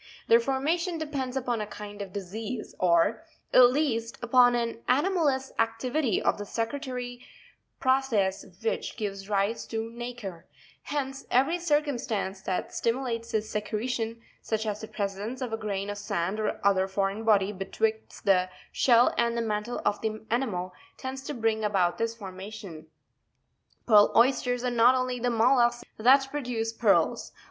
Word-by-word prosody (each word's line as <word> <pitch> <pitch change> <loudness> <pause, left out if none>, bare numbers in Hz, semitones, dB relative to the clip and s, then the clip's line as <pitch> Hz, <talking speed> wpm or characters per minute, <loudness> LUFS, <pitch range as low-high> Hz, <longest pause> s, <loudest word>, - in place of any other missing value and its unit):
Their 230 - +7
for 265 +3 -1
mation 335 +4 0
depends 275 -5 -3
upon 245 -3 -1
a 210 - -4
kind 205 -1 -8
of 195 -2 -6
disease, 210 +4 -5
or, 180 - +3 0.3
at 250 -1 +8
least, 235 -5 -1
upon 245 0 +5
an 230 -1 -2
anomalous 285 -2 +2
activity 230 +2 +1
of - - +1
the - - -3
secretory 245 +1 -4 0.6
process 255 -8 +1 0.2
which 225 - -2
gives 200 -2 -4
rise 205 +2 0
to 225 0 -4
nacre: 235 -7 -7 0.4
hence 270 -2 -4
every 275 +8 +2
circumstance 270 - -1
that 185 -1 -3
stimulates 230 -1 -2
this 215 0 -1
secretion, 225 +2 -2 0.2
such 220 0 -2
as 210 -1 -3
the 220 - -6
presence 205 +4 -4
of 250 -4 -4
a - - 0
grain 200 -2 -3
of 205 0 -4
sand 190 +1 -2
or 215 - -1
other 190 -1 +4
foreign 195 +2 -1
body 205 -3 +3
betwixt 220 +3 -3
the 185 -2 +3 0.2
shell 240 -1 +4
and 235 0 +1
the - - +1
mantle 215 +2 -3
of 205 - +1
the 220 0 -3
animal, 195 -8 -1 0.2
tends 265 0 -5
to 275 - -5
bring 225 -2 0
about 190 -4 +1
this 230 0 -1
formation. 190 -5 -9 1.0
Pearl 210 -3 +6
Oysters 245 0 +3
are 250 - 0
not 240 +1 +5
the - - +1
only 255 -1 -2
mollusks 240 0 +3 0.2
that 265 +4 +5
produce 240 -6 -2
pearls. - - +2
230 Hz, 155 wpm, -28 LUFS, 205-255 Hz, 1.0 s, at